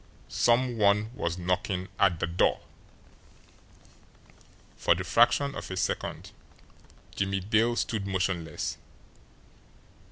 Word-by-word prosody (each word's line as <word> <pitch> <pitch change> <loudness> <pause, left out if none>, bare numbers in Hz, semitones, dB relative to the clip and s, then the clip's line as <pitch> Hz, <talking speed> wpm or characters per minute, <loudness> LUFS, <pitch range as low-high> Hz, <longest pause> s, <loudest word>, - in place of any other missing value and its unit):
SOME 120 0 +2
ONE 105 +2 +3
WAS 85 -8 -3
KNOCKING 90 +1 -1
AT 90 -4 +3
THE - - 0
DOOR! 85 +1 +1 2.2
For - - +3
the - - -4
fraction 140 -1 +3
of - - -7
a 95 - -5
second 95 - -3 0.8
Jimmie 95 0 -1
Dale 110 +4 +2
stood 105 -4 -2
motionless. 90 -4 -2
95 Hz, 100 wpm, -28 LUFS, 90-110 Hz, 2.2 s, ONE